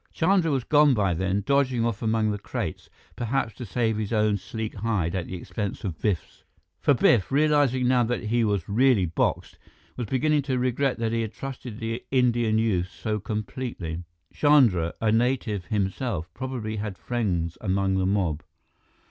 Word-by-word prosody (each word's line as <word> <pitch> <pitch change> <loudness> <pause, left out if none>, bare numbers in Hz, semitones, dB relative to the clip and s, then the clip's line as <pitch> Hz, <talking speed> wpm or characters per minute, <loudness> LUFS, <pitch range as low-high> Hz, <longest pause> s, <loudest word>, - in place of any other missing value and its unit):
Chandra 175 0 +2
was 135 -4 0
gone 145 -1 +5
by 100 -4 +1
then, 95 +4 -1
dodging 130 -3 +2
off 115 -3 -2
among 110 -1 +1
the 105 - -3
crates, - - -5 0.3
perhaps 120 -1 -1
to 125 - -8
save 110 +1 0
his 105 -2 -3
own 105 -2 +2
sleek 110 +3 -5
hide 100 -6 -1
at 95 -3 -2
the 95 - -5
expense 100 +3 -5
of 90 -6 -5
Biff's. 100 -6 -2 0.4
For - - +3
Biff, 115 -3 +3
realizing 145 -3 +3
now 125 -1 +4
that 120 +1 -2
he 115 +2 +1
was 100 -5 0
really 115 -2 +3
boxed, 80 -1 -1 0.4
was 120 -3 -3
beginning 150 +5 +2
to 130 - +1
regret 130 +2 0
that 115 -1 -1
he 115 0 0
had 110 -1 -4
trusted 130 -4 -7
the 115 0 -3
Indian 120 -4 +2
youth 95 -5 +1
so 105 +4 -3
completely. 105 -4 -4 0.3
Chandra, 120 - +4
a 110 -1 +2
native 115 -4 0
himself, 95 - -2
probably 120 -5 -4
had 105 -2 -4
friends 90 -9 -2
among 95 -1 +1
the 95 - +1
mob. 90 -6 0
110 Hz, 170 wpm, -26 LUFS, 100-125 Hz, 0.4 s, gone